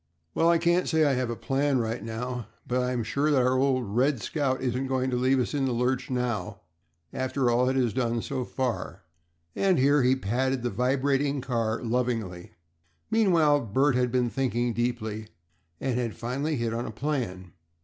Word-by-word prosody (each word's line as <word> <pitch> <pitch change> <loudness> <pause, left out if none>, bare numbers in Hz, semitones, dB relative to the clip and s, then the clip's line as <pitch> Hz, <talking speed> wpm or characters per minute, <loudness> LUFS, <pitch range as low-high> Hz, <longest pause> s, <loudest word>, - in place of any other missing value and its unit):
"Well, 165 - +3
I 170 - +5
can't 170 +2 +2
say 160 -2 +3
I 140 - +3
have 125 -2 -1
a 120 - -2
plan 135 +3 0
right 115 0 -2
now, 120 0 -4 0.2
but 125 +1 0
I'm 125 -1 -1
sure 140 +7 0
that 135 -4 +3
our 130 +1 +2
old 130 -2 +2
'Red 125 +6 +1
Scout' 130 +4 -1
isn't 130 +1 -1
going 130 0 0
to - - 0
leave 130 +2 +2
us 125 - -1
in 140 -2 0
the 130 - 0
lurch 125 +2 0
now 120 -5 -2 0.5
after 130 -1 0
all 125 +2 +3
it 130 - 0
has 125 -5 +1
done 115 -2 -1
so 130 -2 -3
far," 125 -1 -3 0.5
and 190 -3 +2
here 140 +2 +4
he 130 +1 +4
patted 130 +2 -1
the 120 - -1
vibrating 135 +5 +1
car 115 -3 -1
lovingly. 115 -7 -2 0.6
Meanwhile 170 -9 +4
Bert 135 +7 +2
had 125 -1 +1
been 125 -2 +1
thinking 120 -3 0
deeply, 110 -2 -2 0.5
and 130 -2 -1
had 115 -3 -2
finally 140 +6 -2
hit 115 -3 -1
on 120 +1 -3
a - - -5
plan. 110 - -3
125 Hz, 185 wpm, -27 LUFS, 120-135 Hz, 0.6 s, I